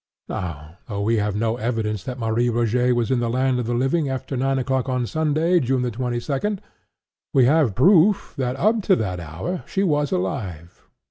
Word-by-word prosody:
Now, 85 Hz, -1 st, -6 dB
though 100 Hz, -2 st, -3 dB
we 115 Hz, +2 st, +2 dB
have 105 Hz, -1 st, -1 dB
no 115 Hz, +2 st, 0 dB
evidence 110 Hz, -4 st, -2 dB
that 125 Hz, 0 st, -5 dB
Marie 115 Hz, 0 st, 0 dB
Rogêt 120 Hz, +2 st, +1 dB
was 120 Hz, +1 st, 0 dB
in 130 Hz, -, +2 dB
the 120 Hz, -1 st, -1 dB
land 130 Hz, +1 st, +1 dB
of 120 Hz, -, -3 dB
the 120 Hz, -, 0 dB
living 135 Hz, +4 st, +1 dB
after 135 Hz, +1 st, -4 dB
nine 135 Hz, +1 st, 0 dB
o'clock 130 Hz, 0 st, -1 dB
on 125 Hz, -1 st, 0 dB
Sunday, 160 Hz, +5 st, +1 dB
June 130 Hz, -2 st, 0 dB
the 125 Hz, -, -1 dB
twenty 120 Hz, +1 st, -2 dB
second, 155 Hz, -, -2 dB, 0.8 s
we 130 Hz, -2 st, +6 dB
have 140 Hz, -6 st, +3 dB
proof 185 Hz, -, +4 dB
that, 130 Hz, -3 st, -2 dB
up 215 Hz, +10 st, +2 dB
to 190 Hz, -1 st, +3 dB
that 90 Hz, -, -2 dB
hour, 85 Hz, -, -5 dB
she 195 Hz, -, -1 dB
was 150 Hz, -5 st, +1 dB
alive. 95 Hz, -, -4 dB
125 Hz, 195 wpm, -22 LUFS, 110-145 Hz, 0.8 s, we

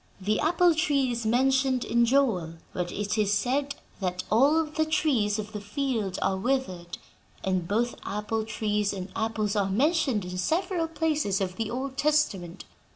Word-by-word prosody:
The 210 Hz, +3 st, 0 dB
apple 345 Hz, +2 st, +4 dB
tree 285 Hz, -5 st, +1 dB
is 235 Hz, -2 st, -2 dB
mentioned 260 Hz, +1 st, +2 dB
in 235 Hz, 0 st, +3 dB
Joel, 225 Hz, -12 st, +2 dB, 0.2 s
where 175 Hz, -1 st, -3 dB
it 205 Hz, +2 st, -2 dB
is 205 Hz, -1 st, +2 dB
said 265 Hz, +7 st, 0 dB, 0.2 s
that 180 Hz, -2 st, -2 dB
'all 285 Hz, +9 st, +4 dB
the 310 Hz, +1 st, -1 dB
trees 260 Hz, -10 st, +1 dB
of 215 Hz, 0 st, -5 dB
the 210 Hz, -, -6 dB
field 210 Hz, -3 st, -2 dB
are 190 Hz, -, +1 dB
withered,' 190 Hz, -7 st, -2 dB, 0.5 s
and 185 Hz, -3 st, 0 dB
both 230 Hz, +5 st, 0 dB
apple 210 Hz, +2 st, -2 dB
trees 210 Hz, -2 st, -1 dB
and 190 Hz, -1 st, -6 dB
apples 220 Hz, -2 st, -1 dB
are 200 Hz, -2 st, +1 dB
mentioned 265 Hz, -, +1 dB
in 180 Hz, 0 st, -5 dB
several 330 Hz, -, 0 dB
places 310 Hz, -11 st, 0 dB
of 185 Hz, -2 st, -2 dB
the 225 Hz, +1 st, -3 dB
Old 265 Hz, +2 st, -4 dB
Testament. 205 Hz, -, 0 dB
225 Hz, 160 wpm, -27 LUFS, 200-275 Hz, 0.5 s, apple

